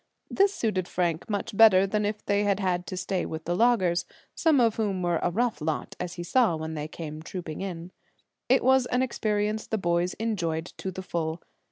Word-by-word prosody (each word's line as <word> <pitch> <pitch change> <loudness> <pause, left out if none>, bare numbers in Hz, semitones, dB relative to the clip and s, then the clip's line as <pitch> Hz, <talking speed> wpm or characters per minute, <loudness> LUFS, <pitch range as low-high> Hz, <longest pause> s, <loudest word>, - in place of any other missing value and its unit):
This 395 0 +4
suited 210 - -1
Frank 175 +2 -1
much 205 0 -3
better 195 -3 +7
than 210 +1 0
if 210 0 -5
they 205 0 +2
had 200 -1 +1
had 180 -3 -1
to 185 - -5
stay 185 0 -1
with 160 0 -6
the 175 - 0
loggers, 190 -6 +2 0.3
some 315 -4 +3
of 230 -3 +3
whom 200 -5 -1
were 175 -1 +1
a - - +1
rough 220 -2 -1
lot, 155 0 -3
as 180 0 -4
he 175 - -5
saw 225 -2 +3
when 160 0 -5
they 150 -1 -4
came 155 -1 -7
trooping 165 -1 -6
in. 180 -2 -5 0.6
It 260 - +4
was 260 0 +4
an 250 +1 +1
experience 215 -3 -1
the 220 - -1
boys 175 -1 0
enjoyed 175 -8 -2
to 190 - -4
the 190 0 -6
full. 165 -2 -3
185 Hz, 205 wpm, -27 LUFS, 170-220 Hz, 0.6 s, better